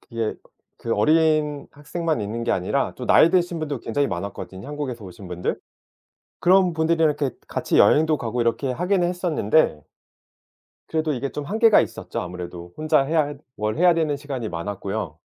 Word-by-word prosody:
그게 115 -2 -3 0.4
그 115 - -2
어린 155 +3 +2
학생만 155 -1 -3
있는 115 +3 -4
게 120 - +1
아니라 95 +10 -1
또 125 - -6
나이 160 - +6
드신 175 -2 +1
분도 145 -6 -3
굉장히 140 +5 0
많았거든요, 95 +2 -6
한국에서 135 -7 -5
오신 90 0 -10
분들. 90 0 -3 0.8
그런 185 -1 +4
분들이랑 160 0 +2
이렇게 140 -5 -2
같이 - - 0
여행도 155 -1 +5
가고 120 +1 -3
이렇게 125 +3 0
하기는 180 +4 +1
했었는데 160 - +1 1.1
그래도 155 -1 0
이게 135 +1 -3
좀 150 - -5
한계가 220 +5 +5
있었죠 - - -4
아무래도. 90 -1 -7
혼자 155 -2 +3
해야 145 0 0 0.2
뭘 105 0 -2
해야 175 -1 +5
되는 155 -3 0
시간이 135 -6 -5
많았고요. 95 -1 -4
145 Hz, 370 characters per minute, -23 LUFS, 105-160 Hz, 1.1 s, 나이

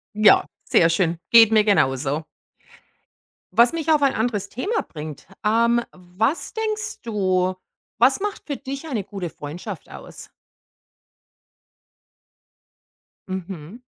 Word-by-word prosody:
Ja, 215 -1 +6 0.2
sehr 165 - +4
schön. 165 0 +1
Geht 225 -1 +8
mir 215 -1 +5
genauso. 145 -6 +1 1.3
Was 235 - +5
mich 320 -1 -1
auf 300 -2 +4
ein 275 - +3
anderes 215 -3 -1
Thema 405 - -2
bringt. 155 -2 -9 0.2
Ähm, 235 +2 +3
was 185 - -2
denkst 430 -1 -3
du, 185 -5 0 0.4
was - - +4
macht 415 0 -3
für 285 - -2
dich 275 +4 -7
eine 230 -10 -2
gute 195 -3 -6
Freundschaft 150 +3 -8
aus? - - -11 3.0
Mhm. 185 +2 -7
210 Hz, 110 wpm, -22 LUFS, 180-255 Hz, 3.0 s, Geht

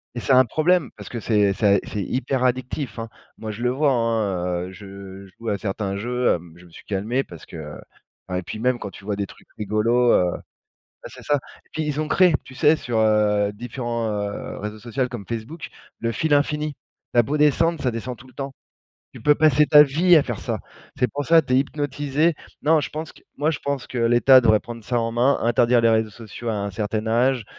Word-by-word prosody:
et - - -3
c'est 130 - +1
un 130 0 +6
problème, 155 +3 +2
parce 100 -3 -9
que 120 - -5
c'est 105 -3 +2
ça 100 0 +3
c'est 105 - -4
hyper 130 +5 -1
addictif, 130 0 -2
hein. 115 0 -4 0.3
Moi, 110 -1 -5
je 105 +3 -8
le 125 - +2
vois, 140 +3 +2
hein, 100 -7 0
heu, 90 - -9
je 100 0 -11
joue 115 -1 -5
à 100 -1 -1
certains 100 0 -3
jeux, 125 +4 0
hem, 85 -1 -6
je 90 - -16
me 85 - -18
suis - - -14
calmé 110 +7 -1
parce 85 -9 -12
que 75 -2 -8 0.5
enfin 90 0 -2
et - - -4
puis 90 - -7
même 125 +2 0
quand 100 - -5
tu 100 - -14
vois? 105 -1 -1
Des 100 0 -3
trucs - - -17
rigolos, 115 +4 +2
heu 90 -1 +3 0.7
bah, - - -8
c'est - - -12
ça, 145 - +1 0.3
et - - -29
puis 155 - -2
ils 150 0 -1
ont 155 - -3
créé, 180 +3 +4
tu 130 - -13
sais, 150 +4 +4
sur, 120 -6 -3
heu, 105 -2 +2
différents, 120 +1 -4
heu, 105 -1 -4
réseaux 105 +1 -6
social 125 +3 -2
comme 110 -6 -7
Facebook, 120 +8 -6 0.3
le 115 - -1
fil 150 +7 -1
infini. 150 +1 0 0.4
Tu - - +1
as - - +8
beau 140 +6 -2
descendre, 155 +2 +2
ça 125 - +1
descend 120 +2 -5
tout 125 - -16
le 130 - -18
temps. 135 0 -6 0.6
Tu - - -11
peux 150 -1 +4
passer 150 -1 +4
ta 150 0 +8
vie 165 +6 +4
à 155 - +6
faire 120 -6 -4
ça. - - -3 0.4
C'est 125 - +1
pour 145 0 -3
ça, 165 0 +6
tu 135 -4 -3
es - - +5
hypnotisé. 145 +2 0 0.3
Non, 155 +2 +4
je 145 - -4
pense 155 +1 -5
que - - -20 0.2
moi 150 +2 +1
je 150 - -3
pense 140 -2 -3
que 130 - -6
l'État 120 +3 +6
devrait 110 -3 +4
prendre 115 -1 -9
ça 120 +2 0
en 115 0 -2
main, 125 +4 +3
interdire 120 +1 +3
les 115 - +4
réseaux 110 -1 +2
sociaux 115 +2 -9
à - - 0
un 100 -1 -3
certain 105 +2 -3
âge. 120 +2 +2
120 Hz, 235 wpm, -23 LUFS, 105-140 Hz, 0.7 s, as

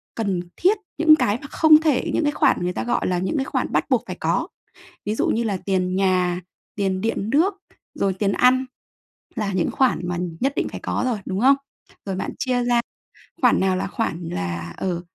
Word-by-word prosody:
cần 200 -5 -1 0.2
thiết, 390 +5 +3 0.2
những 315 0 +7
cái 215 -7 +1
mà 280 - -8
không 310 +1 +5
thể 300 -5 +1
những - - +1
cái 295 - +2
khoản - - +3
người 180 0 -1
ta 110 - -3
gọi 120 - 0
là 180 -1 0
những 190 - -1
cái 270 - 0
khoản - - -2
bắt - - +1
buộc - - +2
phải - - -5
có, - - 0 0.6
ví 210 - -1
dụ - - 0
như 235 - +1
là 205 -4 -1
tiền 185 -1 -1
nhà, 180 -2 +1 0.3
tiền 190 -2 -1
điện 220 0 -2
nước, 340 +9 +3 0.4
rồi 195 -1 0
tiền 195 +1 0
ăn 255 +4 +4 0.7
là 210 -3 -2
những 185 -3 0
khoản 245 -9 +1
mà 175 - -2 0.2
nhất 270 +2 +1
định - - 0
phải - - -8
có - - -1
rồi, 235 -4 0
đúng 190 - -2
không? 275 +3 +6 0.5
Rồi 195 -2 -3
bạn - - -3
chia 250 -2 0
ra 240 -1 +3 0.6
khoản 245 - +4
nào 190 -1 +2
là - - -2
khoản 175 -7 -3
là, 85 -1 -4
ờ, 175 -2 -2
205 Hz, 215 wpm, -22 LUFS, 185-260 Hz, 0.7 s, những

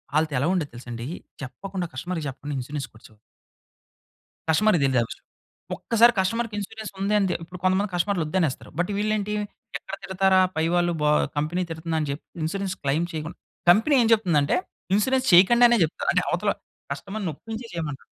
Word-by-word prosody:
ఆళ్ళతో 155 -1 +2
ఎలా 140 - +1
ఉండేదో 165 -6 -1
తెలుసా 120 0 -10
అండి? 115 +1 -5 0.4
చెప్పకుండా 185 +6 -5
కస్టమర్‌కి 165 +3 -4
చెప్పకుండా, 145 +2 -6
ఇన్సూరెన్స్ 135 +2 -5
కొట్టే 110 - -16 1.4
కస్టమర్‌కి 175 0 +4
తెలిదు 130 -2 +3
ఆ - - +2
విషయం. - - -10 0.5
ఒక్కసారి 235 +1 +4
కస్టమర్‌కి 225 +3 0
ఇన్స్యూరెన్స్ 215 +1 -6
ఉందని 200 0 +2
తే - - 0
ఇప్పుడు 180 +2 -10
కొంతమంది 190 +2 +2
కస్టమర్‌లు 175 0 +1
వద్దనేస్తారు. 160 -5 -1
బట్ 175 - +1
వీళ్ళు 215 +1 +1
ఏంటి 210 0 -3 0.4
ఎక్కడ - - -7
తిడతారా 190 0 +3 0.2
పై 160 0 +1
వాళ్ళు, 175 -1 +2
బా 150 0 +3 0.3
కంపెనీ 155 +5 0
తిడుతుందని 160 -2 -2
చెప్పి 140 - -7 0.2
ఇన్స్యూరెన్స్ 195 +3 -2
క్లెయిం 145 +5 +1
చేయకుం 155 +1 -4 0.4
కంపెనీ 225 +10 +4
ఏం 230 - +3
చెప్తుందంటే 170 -10 +2 0.4
ఇన్స్యూరెన్స్ 260 +5 +2
చేయకండి 215 +8 +7
అనే 240 - +4
జెప్తారు. 160 - -2
అంటే, - - +2
అవతల - - +1 0.4
కస్టమర్‌ని 200 -2 -5
ఒప్పించే 225 - -7
చేయమంటారు. 155 -5 -5
180 Hz, 160 wpm, -25 LUFS, 155-205 Hz, 1.4 s, చేయకండి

